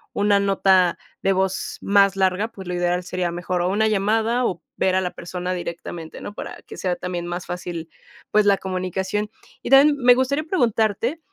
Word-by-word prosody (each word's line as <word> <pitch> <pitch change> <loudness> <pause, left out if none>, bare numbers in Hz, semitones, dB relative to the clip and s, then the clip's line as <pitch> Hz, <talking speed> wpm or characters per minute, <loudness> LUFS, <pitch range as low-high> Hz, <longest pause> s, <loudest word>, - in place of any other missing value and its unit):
una 205 0 +3
nota 190 -2 +3 0.2
de 195 - +3
voz 190 0 -2
más 200 -1 +4
larga, 190 +3 +1
pues, 190 -4 -11
lo 180 - -2
ideal 175 0 0
sería 180 -1 -2
mejor, 175 +1 -2
o 180 - +1
una 220 +3 +2
llamada 220 +4 +1
o 180 -6 -2 0.2
ver 190 - +2
a 190 - +2
la 180 - -1
persona 180 +1 -5
directamente, 170 -2 -6
¿no?, 205 - -7
para - - -7
que - - -10
sea 180 -2 -1
también 175 -1 -4
más 175 +1 -5
fácil, 175 -2 -5 0.4
pues, 215 0 +3
la 200 -1 +5
comunicación. 190 +3 -3 0.3
Y - - -5
también 285 +2 +7
me 250 -2 +6
gustaría 260 +4 0
preguntarte 235 - 0
190 Hz, 185 wpm, -22 LUFS, 180-215 Hz, 0.4 s, también